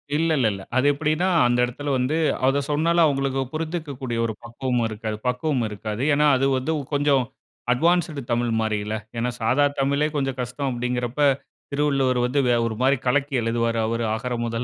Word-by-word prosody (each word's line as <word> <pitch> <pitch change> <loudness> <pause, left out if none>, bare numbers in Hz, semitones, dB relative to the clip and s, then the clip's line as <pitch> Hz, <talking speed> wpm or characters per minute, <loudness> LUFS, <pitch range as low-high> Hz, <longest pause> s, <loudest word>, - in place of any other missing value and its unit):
இல்ல, 165 +2 +1
இல்ல, 125 -4 +3
இல்ல. 100 -1 -6 0.2
அது 130 - +3
எப்படின்னா 155 +5 0 0.2
அந்த 120 0 +1
எடத்தில 140 +4 -4
வந்து 130 +4 0 0.3
அத 135 +2 +3
சொன்னாலும் 165 +3 +3
அவவுங்களுக்கு 135 -2 +1
புரிந்துக்கக்கூடிய 150 -7 -4
ஒரு 110 - -2
பக்குவமும் 120 0 -1
இருக்காது 110 0 -4
பக்குவமும் 125 -1 0
இருக்காது. 105 +2 -5
ஏன்னா 150 +1 +3
அது 135 - +1
வந்து 130 +5 -1 0.2
கொஞ்சம் 140 -2 +3 0.5
அட்வான்ஸ்ட்டு 160 0 +1
தமிழ் 120 0 +1
மாரி 110 -1 0
இல்ல! 110 +1 -2 0.2
ஏன்னா 120 +2 0
சாதா 130 +6 +3
தமிழே 140 +2 +2
கொஞ்சம் 135 -2 -1
கஷ்டம் 125 +3 -3
அப்படிங்குறப்ப, 125 +1 -3 0.5
திருவள்ளுவர் 135 -3 +1
வந்து 130 +3 0 0.3
ஒரு 110 - -4
மாரி 135 +2 +4
கலக்கி 140 +3 +1
எழுதுவாரு 115 0 0
அவரு 115 +1 -1
"அகர 125 +2 -4
முதல" 115 +1 -2
130 Hz, 165 wpm, -23 LUFS, 120-145 Hz, 0.5 s, மாரி